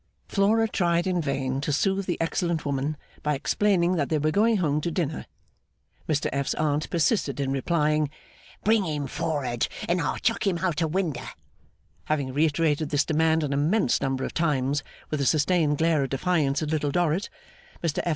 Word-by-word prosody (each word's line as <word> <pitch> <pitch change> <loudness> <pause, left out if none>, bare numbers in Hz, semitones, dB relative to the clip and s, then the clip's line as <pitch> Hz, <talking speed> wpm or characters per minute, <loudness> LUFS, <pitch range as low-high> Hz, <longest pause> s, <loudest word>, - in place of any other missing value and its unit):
Flora 215 +3 +2
tried 175 -4 +1
in 180 -2 0
vain 135 -2 -2
to 150 - -1
soothe 195 +6 0
the 175 - -1
excellent 165 -1 -1
woman 140 +2 -1 0.2
by 150 0 0
explaining 180 +3 +1
that 145 -3 0
they 155 - +2
were 155 +1 +1
going 220 +5 +3
home 150 -5 +1
to 170 - -1
dinner. 160 -3 -3 0.8
Mr 150 -2 +1
F.'s 140 0 -1
Aunt 155 0 0
persisted 160 - +1
in 135 -1 -1
replying, 150 +1 +1 0.5
'Bring 220 -1 +3
him 150 -4 -2
for'ard 130 -4 -1 0.2
and 175 +1 +1
I'll 145 - -1
chuck - - 0
him 185 -3 +1
out 170 -2 -1
o' 165 - +2
winder!' 155 -6 -2 0.8
Having 140 -4 -1
reiterated 155 0 +1
this 145 -1 +2
demand 160 0 +2
an 145 -2 -1
immense 150 - +2
number 135 0 -1
of - - -4
times, 145 -3 +1 0.3
with 150 -2 -1
a - - +1
sustained 155 0 +2
glare 160 -1 +2
of 135 - -1
defiance 150 -1 +1
at 150 - -3
Little 150 -2 0
Dorrit, 175 +4 0 0.5
Mr 165 -3 0
F. - - -1
155 Hz, 180 wpm, -26 LUFS, 145-175 Hz, 0.8 s, going